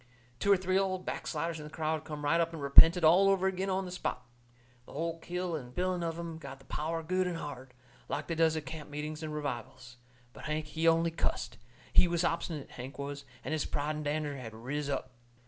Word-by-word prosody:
Two 200 Hz, -, +3 dB
or 200 Hz, -, +7 dB
three 185 Hz, +1 st, +2 dB
old 185 Hz, -1 st, -1 dB
backsliders 165 Hz, +1 st, -2 dB
in -, -, -7 dB
the 150 Hz, -, -8 dB
crowd 155 Hz, 0 st, -2 dB
come 150 Hz, -1 st, -5 dB
right 165 Hz, +3 st, +4 dB
up 165 Hz, 0 st, 0 dB
and 165 Hz, -, -5 dB
repented 165 Hz, +5 st, +8 dB
all 180 Hz, +5 st, +7 dB
over 190 Hz, -1 st, +3 dB
agin 190 Hz, +1 st, -1 dB
on 190 Hz, 0 st, 0 dB
the 180 Hz, -, -6 dB
spot. 125 Hz, -8 st, -3 dB, 0.6 s
The -, -, -12 dB
hull 165 Hz, +2 st, -2 dB
kit 180 Hz, +2 st, -3 dB
and 150 Hz, -8 st, -4 dB
biling 180 Hz, 0 st, 0 dB
of 165 Hz, -1 st, -2 dB
'em 165 Hz, -1 st, -5 dB
got 140 Hz, -3 st, -8 dB
the 135 Hz, -, -19 dB
power 165 Hz, +2 st, -2 dB
good 185 Hz, +3 st, +1 dB
and 175 Hz, -2 st, -2 dB
hard, 130 Hz, -5 st, -7 dB, 0.3 s
like 145 Hz, -, -2 dB
they 165 Hz, -, -2 dB
does 160 Hz, -1 st, +3 dB
at 155 Hz, -, -4 dB
camp 150 Hz, +2 st, -7 dB
meetings 150 Hz, +1 st, -4 dB
and 155 Hz, -1 st, -4 dB
revivals. 125 Hz, -4 st, -5 dB, 0.4 s
But -, -, -10 dB
Hank, 155 Hz, +1 st, -1 dB
he 160 Hz, +2 st, -1 dB
only 165 Hz, 0 st, +4 dB
cussed. 165 Hz, -, -2 dB, 0.3 s
He 180 Hz, -, +7 dB
was 170 Hz, 0 st, +1 dB
obstinate, 165 Hz, -3 st, -1 dB
Hank 130 Hz, +2 st, -8 dB
was, 140 Hz, 0 st, -5 dB, 0.2 s
and -, -, -3 dB
his 155 Hz, -2 st, 0 dB
pride 150 Hz, +2 st, -1 dB
and 150 Hz, -, -4 dB
dander 145 Hz, -1 st, -1 dB
had 115 Hz, -4 st, -7 dB
riz 140 Hz, +6 st, -3 dB
up. 135 Hz, -2 st, -2 dB
160 Hz, 225 wpm, -32 LUFS, 145-170 Hz, 0.6 s, repented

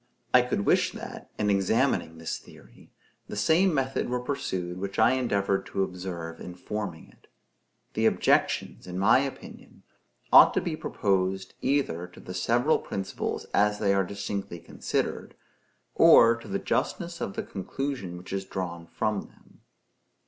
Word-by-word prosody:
I 125 Hz, -, +8 dB
could 120 Hz, -5 st, -2 dB
wish -, -, +3 dB
that, -, -, -9 dB
in 105 Hz, -1 st, +1 dB
examining 100 Hz, -3 st, +1 dB
this 80 Hz, 0 st, -4 dB
theory, -, -, -17 dB, 0.4 s
the -, -, -6 dB
same 160 Hz, -, +3 dB
method 135 Hz, -4 st, -1 dB
were 125 Hz, 0 st, 0 dB
pursued 95 Hz, -9 st, -3 dB
which 100 Hz, 0 st, -5 dB
I 110 Hz, +2 st, +5 dB
endeavored 100 Hz, -6 st, 0 dB
to 95 Hz, -, 0 dB
observe 90 Hz, -3 st, -6 dB
in 90 Hz, -, -8 dB
forming 100 Hz, -2 st, -5 dB
it. -, -, -24 dB, 0.7 s
The -, -, +2 dB
objections, -, -, +1 dB
in 90 Hz, 0 st, -5 dB
my 100 Hz, +7 st, +5 dB
opinion, 135 Hz, 0 st, -7 dB, 0.5 s
ought -, -, +9 dB
to -, -, +4 dB
be -, -, -3 dB
proposed, 95 Hz, -1 st, -1 dB
either 130 Hz, -, 0 dB
to 90 Hz, -, -16 dB
the 90 Hz, -, -8 dB
several 120 Hz, +10 st, +2 dB
principles 95 Hz, -1 st, -4 dB
as 105 Hz, +1 st, +3 dB
they 100 Hz, -2 st, +2 dB
are 100 Hz, 0 st, +3 dB
distinctly 100 Hz, -1 st, -5 dB
considered, -, -, -3 dB, 0.6 s
or 115 Hz, 0 st, +7 dB
to 115 Hz, -, -12 dB
the 200 Hz, -, -1 dB
justness 170 Hz, -3 st, -2 dB
of 100 Hz, -, -3 dB
the -, -, -2 dB
conclusion 100 Hz, -2 st, -4 dB
which 90 Hz, +2 st, -9 dB
is 95 Hz, 0 st, -2 dB
drawn 85 Hz, -3 st, -5 dB
from 110 Hz, +1 st, -1 dB
them. -, -, -24 dB
100 Hz, 155 wpm, -27 LUFS, 90-125 Hz, 0.7 s, ought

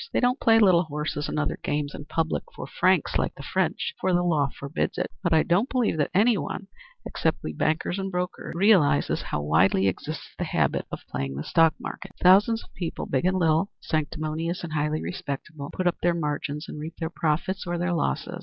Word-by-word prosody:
They -, -, +2 dB
don't 250 Hz, +2 st, +2 dB
play 225 Hz, 0 st, +5 dB
little 185 Hz, -5 st, +5 dB
horses 150 Hz, -1 st, -3 dB
and -, -, -3 dB
other 150 Hz, -, -1 dB
games 145 Hz, 0 st, -2 dB
in 145 Hz, -, -8 dB
public 160 Hz, +1 st, -1 dB
for -, -, -6 dB
francs, -, -, +2 dB
like -, -, -1 dB
the -, -, -9 dB
French, 470 Hz, -, -1 dB
for 185 Hz, -1 st, +2 dB
the 175 Hz, -, +2 dB
law 155 Hz, -5 st, +2 dB
forbids 140 Hz, +5 st, -3 dB
it, -, -, -2 dB
but 175 Hz, -3 st, 0 dB
I 160 Hz, -1 st, +5 dB
don't 195 Hz, +9 st, +2 dB
believe 245 Hz, -10 st, +1 dB
that 145 Hz, -, +1 dB
any 210 Hz, +3 st, +4 dB
one, 195 Hz, -, -5 dB, 0.4 s
except -, -, 0 dB
we -, -, -4 dB
bankers 160 Hz, +4 st, 0 dB
and 195 Hz, 0 st, -2 dB
brokers, 180 Hz, -1 st, -4 dB
realizes 170 Hz, -, +4 dB
how 75 Hz, -, -3 dB
widely 90 Hz, +5 st, +3 dB
exists 95 Hz, -, -4 dB
the -, -, 0 dB
habit -, -, 0 dB
of -, -, -7 dB
playing 70 Hz, 0 st, -3 dB
the 70 Hz, -, -4 dB
stock 165 Hz, -, +4 dB
market. 195 Hz, -1 st, -7 dB
Thousands 205 Hz, +5 st, +5 dB
of -, -, -20 dB
people, 175 Hz, -2 st, -4 dB
big 130 Hz, +4 st, 0 dB
and 185 Hz, +1 st, +2 dB
little, 165 Hz, +2 st, +2 dB
sanctimonious 155 Hz, +2 st, -2 dB
and 165 Hz, -3 st, -5 dB
highly 150 Hz, 0 st, 0 dB
respectable, 145 Hz, -2 st, -5 dB
put 185 Hz, -, -3 dB
up 175 Hz, -, +2 dB
their 175 Hz, 0 st, +2 dB
margins 150 Hz, -1 st, -3 dB
and -, -, -7 dB
reap 160 Hz, +2 st, -6 dB
their 160 Hz, -1 st, -3 dB
profits 175 Hz, +4 st, -1 dB
or 175 Hz, 0 st, -1 dB
their 175 Hz, +1 st, 0 dB
losses. 70 Hz, -, -2 dB
165 Hz, 210 wpm, -26 LUFS, 150-185 Hz, 0.4 s, play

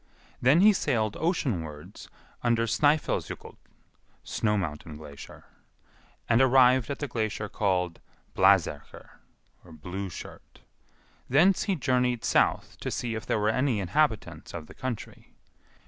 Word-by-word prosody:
Then 140 Hz, +8 st, +5 dB
he 210 Hz, +2 st, +7 dB
sailed 110 Hz, -, 0 dB
oceanwards 90 Hz, -, -3 dB, 0.3 s
under 115 Hz, -1 st, +2 dB
Snœfellsjokull 145 Hz, +6 st, 0 dB, 0.7 s
(snow 105 Hz, -1 st, 0 dB
mountain 75 Hz, -4 st, -5 dB
glacier), 75 Hz, -2 st, -12 dB, 0.8 s
and 115 Hz, -, +4 dB
arrived 130 Hz, -2 st, +5 dB
at 140 Hz, -, -3 dB
the 145 Hz, -, -4 dB
glacier 110 Hz, -3 st, -3 dB
called 90 Hz, -5 st, -1 dB, 0.4 s
Blaserkr 95 Hz, -6 st, +2 dB, 0.5 s
(Blue 90 Hz, +4 st, -7 dB
shirt); -, -, -11 dB, 0.7 s
thence 175 Hz, +8 st, +4 dB
he 195 Hz, -, 0 dB
journeyed 125 Hz, -4 st, 0 dB
south -, -, +1 dB
to -, -, -4 dB
see 120 Hz, -2 st, -3 dB
if 110 Hz, -, -6 dB
there -, -, +1 dB
were 105 Hz, 0 st, +1 dB
any 130 Hz, -1 st, +1 dB
inhabitants 95 Hz, -3 st, -1 dB
of 75 Hz, -, -6 dB
the -, -, -14 dB
country. 130 Hz, -4 st, -7 dB
110 Hz, 120 wpm, -27 LUFS, 95-130 Hz, 0.8 s, he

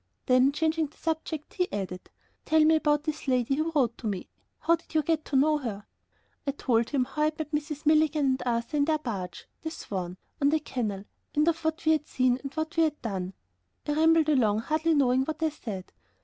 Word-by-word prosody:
Then, 255 Hz, +1 st, +5 dB
changing 315 Hz, +1 st, 0 dB
the 290 Hz, -, -24 dB
subject, 315 Hz, -1 st, -3 dB
he 360 Hz, -1 st, -1 dB
added: 185 Hz, -2 st, -5 dB, 0.4 s
"Tell 315 Hz, -1 st, +4 dB
me 320 Hz, +1 st, +6 dB
about 295 Hz, -1 st, +2 dB
this 310 Hz, -2 st, -4 dB
lady 255 Hz, 0 st, +2 dB
who 310 Hz, +4 st, 0 dB
wrote 245 Hz, -5 st, +2 dB
to 225 Hz, -, -4 dB
me; 195 Hz, -4 st, -3 dB, 0.3 s
how 335 Hz, -, +3 dB
did 330 Hz, -, -18 dB
you 310 Hz, -, +4 dB
get 315 Hz, 0 st, 0 dB
to 280 Hz, -, -4 dB
know 300 Hz, +3 st, +4 dB
her?" 215 Hz, -6 st, -5 dB, 0.6 s
I -, -, +3 dB
told 235 Hz, -4 st, +1 dB
him 270 Hz, -4 st, +1 dB
how 300 Hz, -, -5 dB
I -, -, +5 dB
had 310 Hz, 0 st, -1 dB
met 310 Hz, -1 st, -4 dB
Mrs. 300 Hz, 0 st, -3 dB
Milligan 305 Hz, -1 st, +4 dB
and 260 Hz, -1 st, +1 dB
Arthur 235 Hz, +4 st, -1 dB
in 285 Hz, -, +3 dB
their 315 Hz, 0 st, +2 dB
barge, 195 Hz, -, -5 dB, 0.2 s
the 320 Hz, -, -3 dB
Swan, 185 Hz, -, -5 dB, 0.2 s
on 280 Hz, -, +5 dB
the 315 Hz, +1 st, +2 dB
canal, 220 Hz, -9 st, -3 dB, 0.3 s
and 300 Hz, +2 st, +3 dB
of 330 Hz, -1 st, +1 dB
what 320 Hz, 0 st, -1 dB
we 315 Hz, -, +5 dB
had 305 Hz, -1 st, +1 dB
seen, 255 Hz, -1 st, +2 dB
and 275 Hz, -, -6 dB
what 315 Hz, +1 st, -3 dB
we -, -, +5 dB
had 300 Hz, -1 st, -2 dB
done. 190 Hz, -4 st, -3 dB, 0.5 s
I -, -, +1 dB
rambled 320 Hz, +1 st, +4 dB
along 220 Hz, -7 st, +3 dB
hardly 315 Hz, +5 st, +1 dB
knowing 260 Hz, -2 st, +3 dB
what 315 Hz, +2 st, -4 dB
I 320 Hz, -, +3 dB
said. 215 Hz, -11 st, -7 dB
295 Hz, 220 wpm, -28 LUFS, 245-315 Hz, 0.6 s, me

